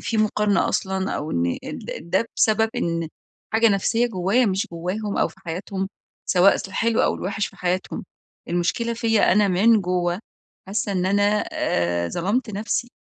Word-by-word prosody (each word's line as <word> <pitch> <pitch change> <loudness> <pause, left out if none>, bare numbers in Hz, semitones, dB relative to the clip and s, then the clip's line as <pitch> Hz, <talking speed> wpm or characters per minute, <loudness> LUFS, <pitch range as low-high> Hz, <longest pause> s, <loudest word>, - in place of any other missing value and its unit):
في 225 - -2
مقارنة 210 -1 +2
أصلًا؟ 190 0 -1
أو 150 - -4
إن 85 0 0 0.4
ده 185 +7 0
بسبب 220 0 +3
إن 165 -1 -1 0.4
حاجة 225 +1 +5
نفسية 225 +4 +2
جوايا 215 +4 +1
مش 190 0 0
جواهم 190 +5 -3
أو - - +3
في - - -18
حياتهم، 190 +2 -4 0.4
سواء 185 +2 +5
في - - -6
الحلو 230 +4 +1
أو - - +2
الوحش 200 +2 -2
في - - -14
حياتهم، 185 +1 -2 0.4
المشكلة 180 +7 0
فيّا 225 -2 +3
أنا 205 0 +4
من 210 +4 +4
جوا 180 -1 0 0.5
حاسة 200 +1 -2
إن 185 -1 0
أنا 205 +2 +3
آآ، 85 0 0
ظلمت 210 +7 -1
نفسي. 220 +4 -2
195 Hz, 155 wpm, -23 LUFS, 180-220 Hz, 0.5 s, حاجة